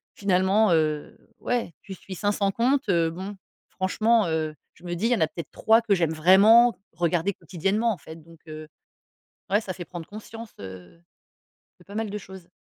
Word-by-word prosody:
finalement, 195 +2 +2
heu, 155 -2 0 0.2
ouais 240 -8 -2
tu 195 - -9
suis 190 +1 -9
500 205 +1 0
comptes 255 +3 +1
heu, 170 -3 +3
bon, 190 +5 -7 0.3
franchement, 215 +4 +1
heu, 160 -1 -1 0.2
je - - -22
me 175 -1 -4
dis: 185 +6 -2
«Il - - 0
y - - +5
en - - -3
a 160 - +4
peut-être 170 +1 -8
3 225 +1 +3
que 225 -3 +1
j'aime 165 -3 +1
vraiment 205 +9 +6 0.2
regarder 175 +2 0
quotidiennement, 195 +7 -1
en - - -8
fait». 160 0 -12
Donc 165 0 -17
heu, 155 0 -8 0.8
ouais 205 +3 +2
ça 190 -4 -5
fait 175 -1 -8
prendre 170 -2 -8
conscience, 220 +2 -10
heu, 90 -3 -11 0.8
de - - -18
pas 200 - -11
mal 220 -1 -2
de 205 - -4
choses. 190 -3 -12
190 Hz, 190 wpm, -25 LUFS, 165-215 Hz, 0.8 s, vraiment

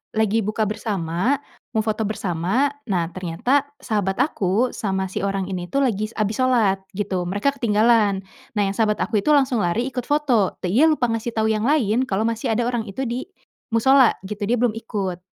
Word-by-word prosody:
lagi 220 0 +2
buka 215 +1 -1
bersama, 205 - -1 0.4
mau 220 - +2
foto 215 -1 -1
bersama. 200 - 0 0.2
Nah, 175 -5 -1
ternyata 185 +12 0 0.2
sahabat 200 -3 0
aku, 220 -2 0
sama 190 -2 -2
si - - -3
orang 195 0 -1
ini 180 -1 -4
tuh 275 +8 0
lagi 215 -5 0
s 220 - -17
habis 215 +1 -1
sholat 235 -7 +3 0.2
gitu, 190 -3 -2
mereka 205 +9 +1
ketinggalan. 215 -5 +2 0.3
Nah, 205 - +2
yang 195 - 0
sahabat 210 +1 +1
aku 220 -1 0
itu 300 +9 +3
langsung 265 -4 +2
lari 190 +5 0
ikut 250 -2 -4
foto, 270 -9 +2
dia 220 - +4
lupa 255 -7 +2
ngasih 230 +1 -3
tahu 220 0 +2
yang 215 +2 0
lain, 255 -4 +2
kalau 200 0 0
masih 230 0 -1
ada 240 - +1
orang 240 -2 -2
itu 200 +7 -4
di 245 +1 -3 0.5
mushola 265 +2 +5
gitu, 205 +2 -6
dia 240 - +2
belum 245 -1 +2
ikut. 195 -6 -4
215 Hz, 190 wpm, -22 LUFS, 195-245 Hz, 0.5 s, mushola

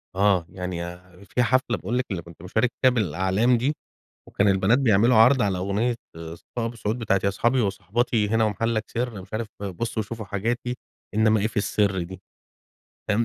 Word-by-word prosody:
آه، 95 -3 +3
يعني 90 -1 -5 0.3
في 125 +6 0
حفلة 125 0 +1
باقول 120 - -2
لِك 130 - 0
اللي 90 -3 -2
كنت 85 -1 -15
مشارك 110 +6 +1
فيها 130 - +6
بالأعلام 100 +3 +2
دي، 130 +6 0 0.6
وكان 100 - +2
البنات 95 +5 +3
بيعملوا 115 -2 +4
عرض 125 +4 +6
على 100 -3 0
أغنية 105 +6 0 0.2
صفاء 85 +8 -6
أبو 115 - -4
السعود 110 +1 -2
بتاعة 100 -4 +1
يا - - +4
أصحابي 120 +6 +1
وصاحباتي 105 +2 0
هنا 115 +1 +2
ومحلك 110 +1 0
سر، 120 -3 -3
مش - - -15
عارف 110 +1 -2 0.2
بصوا 110 +3 -3
شوفوا 110 +1 -7
حاجاتي 115 +5 -2 0.4
إنما 110 0 +3
إيه 105 - +1
في 110 +1 -7
السر 100 -2 +1
دي 95 +2 -8 0.9
فاهم، 105 +3 +2
110 Hz, 175 wpm, -24 LUFS, 95-120 Hz, 0.9 s, فيها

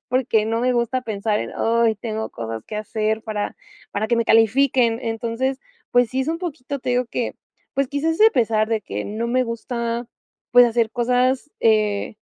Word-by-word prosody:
porque 235 -4 +1
no 225 +1 0
me 255 0 +2
gusta 245 +2 0
pensar 210 -1 -1
en - - -4
"Ay, 230 -1 +2
tengo 220 -1 -4
cosas 115 -1 -6
que 210 - -6
hacer 215 +1 -1
para 210 -2 -3 0.4
para 210 +2 -1
que 235 - +1
me 230 - +1
califiquen". 230 +1 +3
Entonces, 235 +4 -2 0.3
pues 245 -1 +4
sí, 260 +1 -1
es 270 - -2
un 330 - -1
poquito 285 -6 -5
Te 255 0 -2
digo 250 0 +2
que 245 - -2 0.4
pues 275 -1 +1
quizás, 320 +4 -1
a - - +6
pesar 220 -3 +2
de 225 -2 0
que 105 - -5
no 220 +3 -3
me 255 +2 +2
gusta, 235 0 -3 0.4
pues 245 0 +8
hacer 230 -1 +1
cosas, 250 +3 +1
eh, 215 -2 +2
235 Hz, 185 wpm, -22 LUFS, 220-255 Hz, 0.4 s, pues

